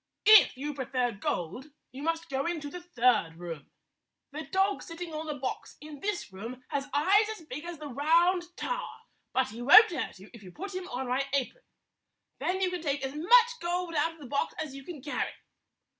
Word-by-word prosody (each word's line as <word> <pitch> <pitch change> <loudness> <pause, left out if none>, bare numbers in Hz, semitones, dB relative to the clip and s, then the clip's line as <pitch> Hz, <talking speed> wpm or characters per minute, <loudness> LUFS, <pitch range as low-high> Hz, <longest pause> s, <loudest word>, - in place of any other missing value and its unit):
If 430 -10 +8
you 295 +3 -4
prefer 255 -2 -1
gold, 200 - -3 0.2
you 265 - -9
must 330 +2 -1
go 275 +2 -2
into 310 -4 -3
the 360 - -7
third 245 - +2
room. 165 -4 -8 0.6
The 305 +2 -6
dog 390 +1 +1
sitting 330 0 -7
on 310 +1 -4
the 300 - -3
box 265 -2 -5
in 300 -1 -10
this 400 - -3
room 235 +6 -8
has 280 0 -2
eyes 385 +10 +4
as 430 -7 -7
big 300 +3 -7
as 345 -1 -6
the 300 0 -7
Round 335 +7 +3 0.2
Tower, - - -4 0.3
but 260 0 +1
he 225 +3 -8
won't 395 - +9
hurt 335 - -4
you 195 +3 -14
if 235 - -12
you 185 -2 -11
put 390 - -7
him 370 0 -5
on 255 +1 -4
my 265 +2 0
apron. 280 - -1 0.7
Then 375 +2 -1
you 370 -1 +1
can 360 -2 -4
take 280 -3 -1
as 265 0 -3
much 475 +10 +5
gold 350 0 -2
out 325 +2 +1
of 325 - -19
the 290 - -10
box 280 +3 -1
as 305 -3 -4
you 275 0 -9
can 300 -4 -9
carry." 290 - -2
295 Hz, 205 wpm, -29 LUFS, 260-355 Hz, 0.7 s, won't